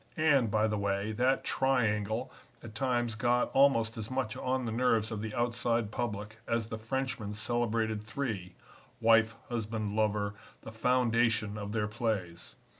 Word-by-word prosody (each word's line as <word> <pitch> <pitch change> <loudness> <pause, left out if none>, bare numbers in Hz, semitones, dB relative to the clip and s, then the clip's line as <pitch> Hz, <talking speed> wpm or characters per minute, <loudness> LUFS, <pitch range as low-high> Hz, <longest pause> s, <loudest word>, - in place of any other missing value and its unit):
And, 140 -7 +4
by 110 +1 +2
the 105 -1 0
way, 100 +1 -1
that 125 +5 +1
Triangle 115 -3 0 0.3
at 110 -2 -9
times 120 -1 0
got 120 +3 +1
almost 115 -5 +3
as 105 - -5
much 130 -4 -2
on 130 0 -1
the 115 - -2
nerves 115 -2 +2
of 110 -2 -3
the 110 -1 -5
outside 120 -2 0
public 110 -2 -4
as 115 -1 -1
the 115 -2 -5
Frenchmen's 115 -3 -3
celebrated 115 -2 0
three 105 -5 -4 0.4
wife, 115 -1 +4
husband, 110 -3 -3
lover 105 -1 +1 0.3
the - - -8
foundation 115 -2 +2
of 105 -1 -5
their 105 -1 0
plays. 105 -6 -3
115 Hz, 150 wpm, -31 LUFS, 105-120 Hz, 0.4 s, And